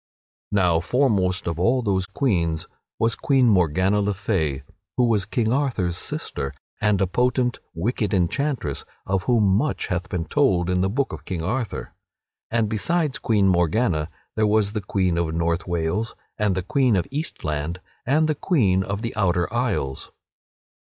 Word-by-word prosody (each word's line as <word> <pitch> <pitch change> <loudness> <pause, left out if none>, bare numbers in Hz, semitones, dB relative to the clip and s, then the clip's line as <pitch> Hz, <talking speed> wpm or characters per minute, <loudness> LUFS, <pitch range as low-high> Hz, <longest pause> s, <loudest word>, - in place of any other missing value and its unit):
Now 90 -5 +3
foremost 95 -4 +1
of 85 -1 -2
all 120 +7 +2
those 95 -3 0
queens 85 - 0 0.3
was 115 0 +2
Queen 135 -1 +3
Morgana 95 +1 +3
le 100 0 0
Fay 80 - -1 0.3
(who 125 - +4
was 110 -5 +2
King 115 -1 0
Arthur's 120 -11 0
sister, 70 -4 -4 0.3
and 105 -2 +3
a 95 - +3
potent, 125 +5 +1 0.2
wicked 105 +3 -1
enchantress, 100 - 0 0.2
of 95 -1 0
whom 120 -4 +3
much 100 +10 +1
hath 90 0 -2
been 85 -2 -2
told 90 - +2
in 90 0 +1
the 95 - +2
Book 130 +6 -1
of - - -7
King 85 -4 -4
Arthur), 120 +5 -3 0.6
and 115 -1 +1
besides 150 +8 0
Queen 105 -4 +2
Morgana 85 -2 +2 0.3
there 110 -1 +2
was 105 -1 +2
the 105 - -2
Queen 95 -3 0
of 80 -2 -1
North 85 +2 0
Wales, 85 +6 -1 0.2
and 105 -3 +1
the 95 - -1
Queen 135 -4 +2
of 90 - +1
Eastland, 85 - -3 0.2
and 155 +5 +2
the 155 - +2
Queen 115 - +2
of 100 +3 -3
the 115 +1 -3
Outer 90 -2 +1
Isles. 120 - -1
100 Hz, 160 wpm, -23 LUFS, 90-120 Hz, 0.6 s, who